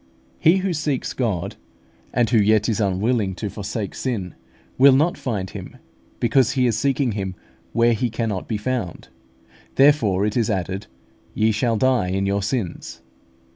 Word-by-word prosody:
_He 180 +4 +5
who 190 -1 -1
seeks 150 -4 -2
God, 100 -7 -2 0.5
and 120 -2 +2
who 115 - +5
yet 105 +1 +3
is 110 -3 0
unwilling 100 0 0
to 105 +1 -4
forsake 105 0 -4
sin, 105 -9 -3 0.5
will 135 0 +8
not 155 +6 +2
find 100 -7 -3
Him, - - -9 0.4
because 125 +1 +3
he 130 -2 +2
is 120 -3 +2
seeking 135 +2 +1
Him 95 -3 -4 0.4
where 120 0 +3
He 120 +2 -1
cannot 110 -4 -3
be 110 - -1
found_; 105 -5 -4 0.7
therefore 125 -9 +4
it 105 - -1
is 115 -4 +1
added, 95 0 -2 0.5
"Ye 110 +1 +3
shall 115 +2 0
die 130 -6 +2
in 95 +1 -1
your 100 +1 0
sins." 100 -3 -4
110 Hz, 160 wpm, -22 LUFS, 100-130 Hz, 0.7 s, will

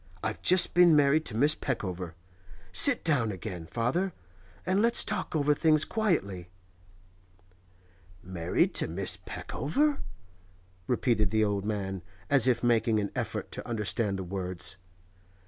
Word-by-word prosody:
I've - - -4
just 185 -1 +5
been 175 -2 +5
married 150 +2 +3
to 110 - -2
Miss 145 +5 +3
Peckover. 90 - -5 0.6
Sit 250 - +6
down 130 -9 +1
again, 90 -3 -7
father, 155 - -2 0.5
and 185 +3 +1
let's 235 +1 +2
talk - - -3
over 150 -1 +2
things 155 0 +2
quietly.' 100 - -2 1.7
'Married 90 -2 -1
to - - -1
Miss 90 +4 -1
Peckover?' 280 - -2 0.9
repeated 115 -4 0
the 110 +1 +1
old 100 -1 -2
man, 95 -3 -4 0.3
as 135 -3 +6
if 125 -1 +1
making 115 -2 +2
an 100 -1 -3
effort - - -4
to - - -8
understand 105 -2 -2
the 95 - -5
words. 90 -1 -3
115 Hz, 130 wpm, -28 LUFS, 95-155 Hz, 1.7 s, Sit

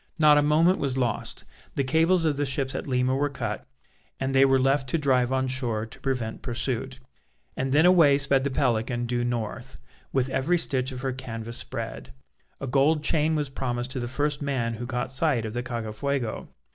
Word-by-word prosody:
Not 150 -2 +6
a - - +4
moment 160 +5 +3
was 135 -2 -1
lost. 120 -4 -2 0.3
The 140 - +1
cables 165 +5 +3
of 155 -2 +2
the 145 +1 0
ships 130 0 -2
at - - -4
Lima 130 0 +1
were 145 +2 +1
cut, 140 - -4 0.5
and 135 0 -1
they 135 0 +6
were 135 0 +4
left 135 +1 +1
to 165 - +1
drive 130 -4 +2
on 130 0 +1
shore 120 -4 -1
to 115 - -14
prevent 125 -5 -3
pursuit; 130 +1 -3 0.6
and 130 0 -2
then 150 +4 +5
away 165 -6 +6
sped 140 -1 +2
the 140 - 0
Pelican 120 -1 0
due 120 0 -1
north, 115 - -4 0.3
with 130 0 0
every 170 +8 +2
stitch 130 -5 -1
of 125 -1 -6
her 130 -1 -1
canvas 115 -3 -6
spread. - - -6 0.5
A - - -4
gold 145 +4 +2
chain 155 +1 +2
was 150 -2 -1
promised 125 -2 -3
to 130 - -3
the 120 - -3
first 145 +3 -1
man 130 -5 -1
who 120 +2 -5
caught 125 0 -3
sight 130 -4 0
of 110 - -5
the 120 - -2
Cacafuego. 120 +1 -3
130 Hz, 195 wpm, -26 LUFS, 120-145 Hz, 0.6 s, Not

